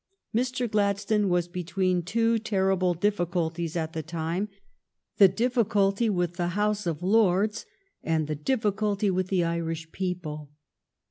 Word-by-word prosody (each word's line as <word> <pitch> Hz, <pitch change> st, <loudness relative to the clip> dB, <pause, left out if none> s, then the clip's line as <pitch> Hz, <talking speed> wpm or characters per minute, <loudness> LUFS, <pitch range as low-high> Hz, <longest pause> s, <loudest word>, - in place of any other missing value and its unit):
Mr. 250 Hz, +1 st, 0 dB
Gladstone 205 Hz, -1 st, +1 dB
was 175 Hz, -1 st, +1 dB
between 180 Hz, +1 st, -1 dB
two 225 Hz, +5 st, +1 dB
terrible 190 Hz, -4 st, +1 dB
diffi 190 Hz, 0 st, 0 dB
culties 170 Hz, -1 st, -2 dB
at 160 Hz, -1 st, -2 dB
the 160 Hz, -, -3 dB
time, 165 Hz, +5 st, -3 dB, 0.7 s
the 200 Hz, -, +9 dB
difficulty 210 Hz, -1 st, +1 dB
with 175 Hz, -3 st, -1 dB
the 175 Hz, -1 st, 0 dB
House 210 Hz, -2 st, 0 dB
of 165 Hz, 0 st, -3 dB
Lords 210 Hz, +1 st, +2 dB, 0.4 s
and 160 Hz, -1 st, 0 dB
the 155 Hz, -, -3 dB
difficulty 205 Hz, -, 0 dB
with 185 Hz, 0 st, 0 dB
the 185 Hz, -2 st, +1 dB
Irish 165 Hz, -1 st, -3 dB
people. 170 Hz, -6 st, -4 dB
185 Hz, 135 wpm, -27 LUFS, 170-210 Hz, 0.7 s, the